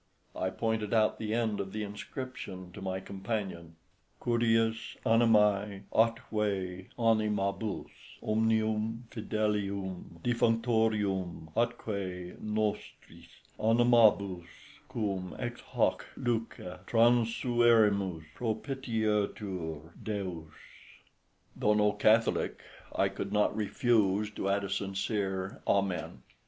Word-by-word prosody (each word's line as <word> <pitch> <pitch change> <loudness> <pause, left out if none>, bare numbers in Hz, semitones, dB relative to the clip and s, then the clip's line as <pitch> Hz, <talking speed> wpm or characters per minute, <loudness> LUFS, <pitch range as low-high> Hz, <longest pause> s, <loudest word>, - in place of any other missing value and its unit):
I 95 - -1
pointed 110 +1 -1
out 110 -1 +3
the 110 -1 -3
end 115 -3 0
of 95 -1 -4
the 110 0 -2
inscription 105 -3 -7
to 100 - -10
my 95 0 -2
companion 95 -5 -4 0.4
"CVIVS 115 -1 +1
ANIMÆ, 105 -3 +3
ATQVE 105 -5 0
ANIMABVS 110 -2 -1
OMNIVM 110 +1 +1
FIDELIVM 100 -5 -2
DEFVNCTORVM, 110 -8 +1
ATQVE 100 -7 -2
NOSTRIS 105 -1 -3 0.3
ANIMABVS 110 -6 +4 0.4
QVVM 100 -7 -3
EX 120 -1 -4
HAC - - 0
LVCE 110 -6 -3
TRANSIVERIMVS, 115 -6 +3
PROPITIETVR 105 - -2
DEVS." 90 -7 -4 1.0
Though 105 0 +2
no 105 0 +4
Catholic, 110 +2 +2 0.4
I 100 - +3
could 95 0 -5
not 105 0 +2
refuse 105 -2 +2
to 100 -2 -2
add 100 +1 +1
a 100 - -4
sincere 95 -1 -2
Amen. 95 -4 0
105 Hz, 90 wpm, -31 LUFS, 95-115 Hz, 1.0 s, ANIMABVS